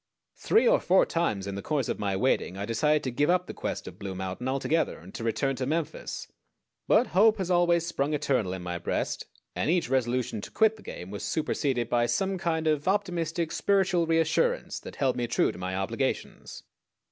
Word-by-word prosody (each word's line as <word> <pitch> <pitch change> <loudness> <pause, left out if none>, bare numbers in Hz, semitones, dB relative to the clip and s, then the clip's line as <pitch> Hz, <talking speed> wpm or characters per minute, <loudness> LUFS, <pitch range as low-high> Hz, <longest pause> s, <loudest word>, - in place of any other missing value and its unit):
Three 450 - +3
or - - +5
four 190 +1 +4
times 110 - -1
in 100 - -4
the 100 - -4
course 145 -2 -1
of - - -2
my 100 -2 -1
waiting 95 -3 0
I 100 - -3
decided 150 +7 +1
to 130 - -2
give 145 +6 +1
up 180 0 +3
the - - -7
quest - - -4
of - - -10
Blue 95 -2 -5
Mountain 95 +6 -4
altogether 135 +5 0
and 90 +3 -13
to - - -6
return 135 +4 0
to 130 - -2
Memphis; 160 +1 -3 0.6
but - - +5
hope 215 +4 +5
has 185 -2 -2
always 175 -1 +3
sprung 150 -3 -1
eternal 130 -10 0
in 95 -1 -6
my 90 -1 -4
breast, - - -2 0.3
and - - -1
each 170 -6 +1
resolution 125 -4 0
to - - -8
quit 220 0 +3
the 215 - -15
game 90 +2 -8
was 100 -2 -6
superseded 135 -6 -1
by 120 0 +2
some 195 +6 0
kind 165 -3 -1
of 155 0 +1
optimistic 175 -4 0
spiritual 190 -4 +2
reassurance 165 - +1
that - - -10
held 135 -3 +1
me 120 -1 -1
true - - +2
to - - -11
my 95 0 -3
obligations. 95 0 -3
145 Hz, 205 wpm, -28 LUFS, 115-175 Hz, 0.6 s, or